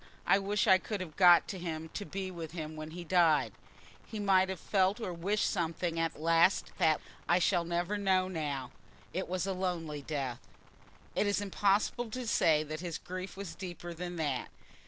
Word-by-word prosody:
I 195 Hz, -, +5 dB
wish 200 Hz, +1 st, 0 dB
I 190 Hz, -, +6 dB
could 210 Hz, +1 st, -4 dB
have 170 Hz, -4 st, -7 dB
got 175 Hz, -2 st, +7 dB
to 190 Hz, -, -4 dB
him 160 Hz, -2 st, -4 dB
to 205 Hz, -, -5 dB
be 190 Hz, -1 st, -4 dB
with 165 Hz, -3 st, -7 dB
him 155 Hz, -2 st, -5 dB
when 155 Hz, 0 st, -6 dB
he 175 Hz, +2 st, -7 dB
died. 170 Hz, -3 st, +3 dB, 0.5 s
He 220 Hz, -, -8 dB
might 190 Hz, -2 st, +4 dB
have 190 Hz, -2 st, -4 dB
felt 195 Hz, +2 st, +1 dB
or 190 Hz, -6 st, -3 dB
wished 195 Hz, +5 st, 0 dB
something 165 Hz, -1 st, -1 dB
at 165 Hz, 0 st, 0 dB
the -, -, -12 dB
last 165 Hz, +3 st, +3 dB
that 160 Hz, -4 st, +4 dB, 0.3 s
I 175 Hz, -, +5 dB
shall 175 Hz, -1 st, +2 dB
never 175 Hz, +4 st, -1 dB
know 190 Hz, -2 st, +2 dB
now. 145 Hz, -7 st, -3 dB, 0.4 s
It 185 Hz, +2 st, -2 dB
was 185 Hz, 0 st, -1 dB
a 195 Hz, -, -1 dB
lonely 170 Hz, -5 st, -3 dB
death." 135 Hz, -4 st, -3 dB, 0.8 s
It 210 Hz, -, +2 dB
is 205 Hz, -, +1 dB
impossible 205 Hz, +4 st, +1 dB
to 255 Hz, +3 st, -4 dB
say 155 Hz, -8 st, +3 dB
that 155 Hz, +1 st, -6 dB
his 170 Hz, -2 st, -4 dB
grief 185 Hz, +1 st, -7 dB
was 195 Hz, -4 st, -6 dB
deeper 175 Hz, -1 st, -7 dB
than 175 Hz, +1 st, -5 dB
that. 145 Hz, -6 st, -1 dB
175 Hz, 195 wpm, -32 LUFS, 160-195 Hz, 0.8 s, got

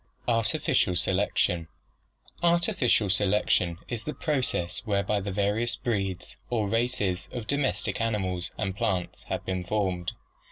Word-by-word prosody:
ARTIFICIAL 115 Hz, -5 st, +2 dB
SELECTION 90 Hz, -2 st, +2 dB, 0.7 s
Artificial 170 Hz, -10 st, +3 dB
selection 95 Hz, -3 st, +2 dB
is 120 Hz, -3 st, -4 dB
the 150 Hz, -, -4 dB
process 130 Hz, -, 0 dB
whereby 100 Hz, -1 st, +1 dB
the 100 Hz, +1 st, -4 dB
various 105 Hz, +5 st, +1 dB
breeds 95 Hz, -6 st, -2 dB
or 110 Hz, -4 st, +1 dB
races 105 Hz, -5 st, 0 dB
of 120 Hz, -3 st, -5 dB
domestic 140 Hz, -2 st, 0 dB
animals 95 Hz, -6 st, -1 dB
and 95 Hz, 0 st, -2 dB
plants 100 Hz, -6 st, -2 dB
have -, -, -3 dB
been 95 Hz, -1 st, -1 dB
formed. 90 Hz, -3 st, -1 dB
100 Hz, 120 wpm, -28 LUFS, 95-115 Hz, 0.7 s, Artificial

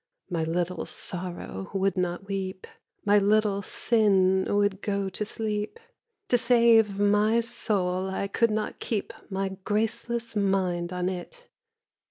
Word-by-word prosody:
My 165 Hz, -2 st, 0 dB
Little 175 Hz, +2 st, -2 dB
Sorrow 175 Hz, -, -5 dB
would 195 Hz, -1 st, +1 dB
not 180 Hz, 0 st, -2 dB
weep, 190 Hz, -1 st, -4 dB, 0.4 s
My 205 Hz, 0 st, +5 dB
Little 205 Hz, 0 st, +2 dB
Sin 190 Hz, -3 st, +2 dB
would 205 Hz, -1 st, +1 dB
go 200 Hz, -1 st, -1 dB
to 200 Hz, -, -3 dB
sleep— 210 Hz, -, -3 dB, 0.5 s
To 245 Hz, -, +4 dB
save 230 Hz, -4 st, +4 dB
my 210 Hz, +2 st, +3 dB
soul 190 Hz, -6 st, -1 dB
I 190 Hz, +1 st, -2 dB
could 230 Hz, +3 st, +2 dB
not 215 Hz, 0 st, -2 dB
keep 215 Hz, -4 st, -3 dB, 0.2 s
My 195 Hz, 0 st, -1 dB
graceless 225 Hz, +2 st, -1 dB
mind 185 Hz, -4 st, 0 dB
on 180 Hz, 0 st, -1 dB
it! 190 Hz, -, -6 dB
200 Hz, 130 wpm, -27 LUFS, 185-215 Hz, 0.5 s, My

